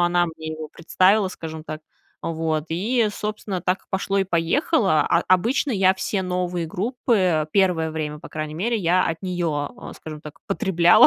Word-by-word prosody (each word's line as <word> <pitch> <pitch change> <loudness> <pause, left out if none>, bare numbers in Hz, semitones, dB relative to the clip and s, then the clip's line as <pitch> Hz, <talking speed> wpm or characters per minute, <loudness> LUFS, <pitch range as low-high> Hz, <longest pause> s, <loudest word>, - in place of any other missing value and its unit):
она 175 0 +3
мне 160 -1 -7
его 155 -1 -5
представила, 185 +5 +3
скажем 160 -3 -7
так. 155 -1 -6 0.4
Вот 160 -2 -1
и, 220 +7 +1
собственно, 210 -3 -4
так 180 +2 0
и - - -28
пошло 195 +1 -1
и 195 - +3
поехало. 185 - +2
А 170 +4 +2
обычно 230 +10 +3
я 190 -3 +4
все 190 +1 -2
новые 180 -2 -1
группы 190 - +1
первое 180 -5 +2
время, 150 -1 -4
по - - -11
крайней 155 0 -4
мере, 225 +8 0
я 180 -1 +3
от 165 0 -2
неё, 170 -6 -1 0.2
э, - - -9
скажем 155 -1 -9
так, 150 -1 -10
потребляла, 185 -4 +5
175 Hz, 175 wpm, -23 LUFS, 160-195 Hz, 0.4 s, потребляла